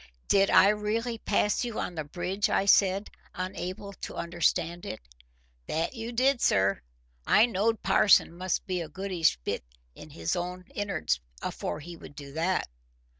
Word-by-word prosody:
"Did 195 Hz, 0 st, +4 dB
I 195 Hz, -, +7 dB
really 220 Hz, +3 st, -1 dB
pass 210 Hz, +1 st, +1 dB
you 235 Hz, -3 st, -3 dB
on -, -, -3 dB
the 155 Hz, -2 st, -3 dB
bridge?" 180 Hz, +6 st, -2 dB
I 195 Hz, -, +2 dB
said, 195 Hz, 0 st, +4 dB, 0.2 s
unable 185 Hz, +2 st, -5 dB
to -, -, -8 dB
understand 170 Hz, 0 st, 0 dB
it. 110 Hz, -, -5 dB, 0.7 s
"That 165 Hz, +7 st, -1 dB
you 230 Hz, -1 st, -5 dB
did, 255 Hz, +2 st, +2 dB
sir. 100 Hz, 0 st, +3 dB, 0.5 s
I 220 Hz, -, +6 dB
knowed 225 Hz, 0 st, 0 dB
parson 200 Hz, -5 st, +5 dB
must 185 Hz, +1 st, -2 dB
be 185 Hz, -3 st, -2 dB
a 160 Hz, -, -6 dB
goodish 180 Hz, -, 0 dB
bit -, -, -2 dB, 0.3 s
in -, -, -12 dB
his 85 Hz, 0 st, -2 dB
own 180 Hz, +1 st, -4 dB
in'ards 80 Hz, -, -1 dB, 0.2 s
afore -, -, -4 dB
he 170 Hz, +3 st, -9 dB
would 145 Hz, -, -12 dB
do 140 Hz, -1 st, -9 dB
that." 170 Hz, +4 st, 0 dB
185 Hz, 160 wpm, -28 LUFS, 170-210 Hz, 0.7 s, I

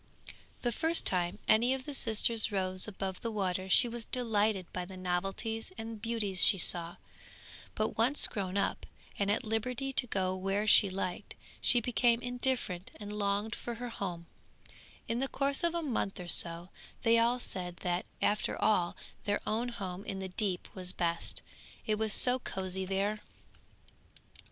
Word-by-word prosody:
The 240 Hz, -, +1 dB
first 320 Hz, +7 st, +4 dB
time 180 Hz, +1 st, +1 dB
any 240 Hz, +4 st, +4 dB
of 260 Hz, -1 st, -8 dB
the 290 Hz, -, -6 dB
sisters 225 Hz, -2 st, +3 dB
rose 185 Hz, -1 st, 0 dB
above 190 Hz, -2 st, -5 dB
the 230 Hz, -, -3 dB
water 190 Hz, -3 st, -2 dB
she 240 Hz, -, +8 dB
was 235 Hz, -1 st, -6 dB
delighted 215 Hz, -5 st, 0 dB
by 180 Hz, -, -3 dB
the 185 Hz, +1 st, -10 dB
novelties 195 Hz, -, -2 dB
and 225 Hz, -1 st, -7 dB
beauties 210 Hz, -5 st, +5 dB
she 195 Hz, -, +6 dB
saw; 170 Hz, -1 st, +3 dB, 0.8 s
but 215 Hz, +1 st, -2 dB
once 255 Hz, +6 st, +4 dB
grown 195 Hz, -2 st, -3 dB
up, 200 Hz, -, -1 dB, 0.3 s
and 200 Hz, 0 st, +1 dB
at 210 Hz, -, +1 dB
liberty 250 Hz, +4 st, -2 dB
to 250 Hz, -, 0 dB
go 185 Hz, -3 st, -1 dB
where 195 Hz, +2 st, -1 dB
she 210 Hz, -1 st, +6 dB
liked, 185 Hz, -1 st, -5 dB, 0.3 s
she 245 Hz, -, +5 dB
became 240 Hz, 0 st, +2 dB
indifferent 245 Hz, -7 st, -1 dB
and 205 Hz, -1 st, -8 dB
longed 205 Hz, +1 st, -1 dB
for 240 Hz, -, -5 dB
her 245 Hz, +1 st, -6 dB
home; 180 Hz, -6 st, -5 dB, 0.8 s
in 230 Hz, +1 st, -1 dB
the 270 Hz, -, 0 dB
course 275 Hz, +2 st, -1 dB
of 340 Hz, 0 st, +1 dB
a 340 Hz, -, -2 dB
month 225 Hz, -8 st, -2 dB
or 180 Hz, -, -7 dB
so 170 Hz, 0 st, +2 dB, 0.3 s
they 230 Hz, 0 st, +5 dB
all 240 Hz, +2 st, +2 dB
said 180 Hz, -6 st, -5 dB
that 175 Hz, 0 st, -2 dB, 0.2 s
after 210 Hz, +1 st, 0 dB
all 180 Hz, -5 st, +1 dB, 0.3 s
their 205 Hz, 0 st, 0 dB
own 230 Hz, +3 st, -1 dB
home 195 Hz, -5 st, -6 dB
in 195 Hz, -, -4 dB
the 190 Hz, 0 st, -5 dB
deep 185 Hz, -1 st, -2 dB
was 180 Hz, -1 st, -4 dB
best, 170 Hz, -2 st, 0 dB, 0.4 s
it 215 Hz, -1 st, 0 dB
was 220 Hz, -1 st, +1 dB
so 250 Hz, +5 st, +3 dB
cosy 190 Hz, -4 st, -3 dB
there. 200 Hz, +3 st, -1 dB
210 Hz, 165 wpm, -31 LUFS, 185-235 Hz, 0.8 s, she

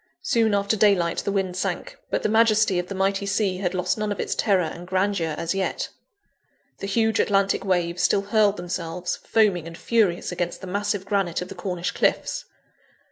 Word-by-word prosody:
Soon 225 Hz, -3 st, +2 dB
after 200 Hz, +2 st, +1 dB
daylight 195 Hz, -5 st, +3 dB
the 200 Hz, -, -2 dB
wind 190 Hz, -2 st, -1 dB
sank; 180 Hz, -1 st, -3 dB
but -, -, -1 dB
the -, -, +2 dB
majesty 220 Hz, -3 st, +3 dB
of 180 Hz, -, -3 dB
the 195 Hz, -, -5 dB
mighty 195 Hz, +1 st, 0 dB
sea 200 Hz, -2 st, 0 dB
had 185 Hz, -1 st, -2 dB
lost 180 Hz, +3 st, 0 dB
none 210 Hz, -1 st, -1 dB
of 205 Hz, -, -3 dB
its -, -, -1 dB
terror 195 Hz, -5 st, +2 dB
and 170 Hz, +2 st, -6 dB
grandeur 185 Hz, -4 st, 0 dB
as 165 Hz, +1 st, -1 dB
yet. 195 Hz, -1 st, -2 dB, 0.9 s
The 195 Hz, -, -4 dB
huge 220 Hz, +1 st, +1 dB
Atlantic 195 Hz, -1 st, +2 dB
waves 175 Hz, -2 st, 0 dB
still 200 Hz, -, +3 dB
hurled 205 Hz, 0 st, +2 dB
themselves, 175 Hz, 0 st, -3 dB
foaming 200 Hz, -7 st, +1 dB
and 165 Hz, 0 st, -9 dB
furious, 205 Hz, -8 st, +1 dB
against 175 Hz, -1 st, -3 dB
the -, -, -8 dB
massive 205 Hz, +1 st, -2 dB
granite 195 Hz, -4 st, 0 dB
of 180 Hz, -, -11 dB
the -, -, -6 dB
Cornish 180 Hz, -1 st, -3 dB
cliffs. -, -, 0 dB
195 Hz, 190 wpm, -24 LUFS, 180-205 Hz, 0.9 s, daylight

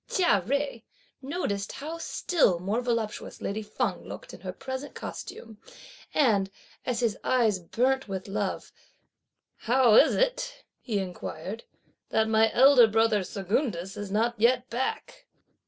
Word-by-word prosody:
Chia 345 Hz, -, +3 dB
Jui 275 Hz, +3 st, -2 dB, 0.4 s
noticed 260 Hz, -, -3 dB
how 315 Hz, +4 st, -6 dB
still 320 Hz, -, +1 dB
more 200 Hz, +7 st, -1 dB
voluptuous 230 Hz, -3 st, -3 dB
lady 210 Hz, +2 st, -3 dB
Feng 210 Hz, -3 st, -2 dB
looked -, -, -9 dB
in -, -, -10 dB
her 185 Hz, 0 st, -4 dB
present 260 Hz, +8 st, -6 dB
costume, 220 Hz, -2 st, -8 dB, 0.5 s
and, 210 Hz, -9 st, +3 dB, 0.4 s
as 250 Hz, -1 st, 0 dB
his 225 Hz, -4 st, 0 dB
eyes 225 Hz, -6 st, +2 dB
burnt 255 Hz, +9 st, 0 dB
with 190 Hz, -1 st, -5 dB
love, 200 Hz, 0 st, -3 dB, 0.8 s
"How 245 Hz, -1 st, +3 dB
is -, -, +6 dB
it," -, -, -1 dB
he 220 Hz, -5 st, -2 dB
inquired, 185 Hz, +1 st, -5 dB, 0.4 s
"that 220 Hz, 0 st, +2 dB
my 220 Hz, 0 st, +4 dB
elder 260 Hz, -2 st, +7 dB
brother 220 Hz, -2 st, +2 dB
Secundus 195 Hz, -, -2 dB
is 205 Hz, -1 st, -6 dB
not 225 Hz, +4 st, +1 dB
yet 245 Hz, +2 st, +2 dB
back?" 380 Hz, -, -4 dB
225 Hz, 135 wpm, -27 LUFS, 200-260 Hz, 0.8 s, elder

